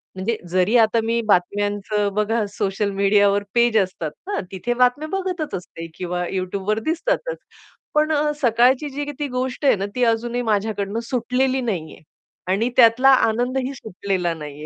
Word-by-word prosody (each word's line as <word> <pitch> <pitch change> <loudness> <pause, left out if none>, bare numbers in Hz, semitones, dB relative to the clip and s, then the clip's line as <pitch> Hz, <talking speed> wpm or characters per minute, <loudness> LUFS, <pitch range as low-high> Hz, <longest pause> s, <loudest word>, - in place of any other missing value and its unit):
म्हणजे 205 +4 -2
जरी 185 +5 +2
आता 225 0 +4
मी 230 +1 0
बातम्यांचं 205 +2 +1
बघा 215 +1 0
सोशल 200 +1 -1
मीडियावर 200 +1 +3
पेज 235 -2 +3
असतात 185 -5 -1 0.2
ना, 410 - -2
तिथे 195 +6 -2
बातम्या 250 +5 +2
बघतच 365 - -3
असते 165 -2 -8
किंवा 180 -1 -3
YouTubeवर 195 +3 -2
दिसतातच. - - -1 0.6
पण 305 +1 +2 0.3
सकाळची 250 +4 +3
जी 285 +1 -4
ती 290 - -1
गोष्ट 255 +2 -3
आहे 270 - +5
ना 195 0 -3
ती 250 - +1
अजूनही 235 +1 0
माझ्याकडनं 205 0 -1
सुटलेली 255 +1 0
नाहीये. 185 -10 -4 0.5
आणि 200 +6 +1
त्यातला 245 +3 +6 0.2
आनंदही 255 +4 -1
सुटलेला 190 -6 -3
नाहीये. 150 -2 -8
220 Hz, 145 wpm, -21 LUFS, 195-250 Hz, 0.6 s, त्यातला